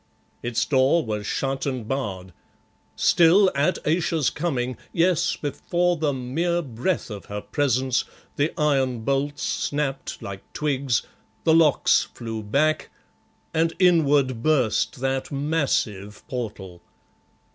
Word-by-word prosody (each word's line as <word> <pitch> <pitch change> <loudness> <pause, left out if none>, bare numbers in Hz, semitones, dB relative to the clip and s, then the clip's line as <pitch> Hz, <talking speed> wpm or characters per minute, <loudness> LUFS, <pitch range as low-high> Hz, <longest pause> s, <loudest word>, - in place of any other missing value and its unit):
Its 120 -1 -1
door 140 +4 +3
was 105 -2 -3
shut 135 +1 -2
and 130 -5 -3
barred; 95 -9 -4 0.6
still, 180 +3 +5
at 145 +6 +1
Ayesha's 160 -2 +1
coming, 130 -6 -2 0.2
yes, 175 0 +2
before 175 +4 0
the 155 -3 0
mere 160 +7 -1
breath 130 +3 -2
of 100 -1 -7
her 105 0 -5
presence, 130 0 0 0.3
the 145 +3 +1
iron 135 -5 +1
bolts 140 +4 -1
snapped 145 -2 -2
like 95 -1 -7
twigs, 135 -5 0 0.4
the 160 - +4
locks 160 -3 +4
flew 115 -2 -5
back, 150 +9 +1 0.6
and 165 +1 +1
inward 145 -9 +3
burst 130 -4 +1
that 135 +1 -1
massive 135 -9 -1
portal. 105 -9 -6
135 Hz, 115 wpm, -24 LUFS, 120-155 Hz, 0.6 s, still